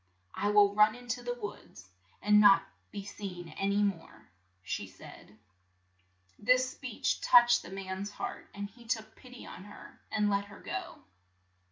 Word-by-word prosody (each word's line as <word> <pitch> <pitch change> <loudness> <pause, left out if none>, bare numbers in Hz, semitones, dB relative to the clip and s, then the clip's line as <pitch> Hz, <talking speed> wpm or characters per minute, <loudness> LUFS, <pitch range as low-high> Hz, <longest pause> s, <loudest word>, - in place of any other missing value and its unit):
"I 205 - -1
will 205 -1 +5
run 210 +1 +5
in 245 0 -13
to 245 +2 -2
the 245 0 -3
wilds, 205 - -9 0.4
and 210 0 +6
not 200 -2 +7 0.2
be 200 -1 -7
seen 180 -4 -7
an 195 +5 -2
y 205 +1 +2
more," 190 - -4 0.3
said 95 0 -7
she. 105 - -21 1.0
This 255 +4 +3
speech 250 -5 -2
touched 240 -1 +6
the - - -11
man's 190 +1 -5
heart, - - -6
and 200 0 -4
he 235 +3 -18
took 220 -2 -2
pit 255 -1 -15
y - - -10
on 185 - -10
her, 205 - -13
and 210 -1 +1
let 200 0 +1
her 200 0 -13
go. - - -6
205 Hz, 170 wpm, -31 LUFS, 195-230 Hz, 1.0 s, not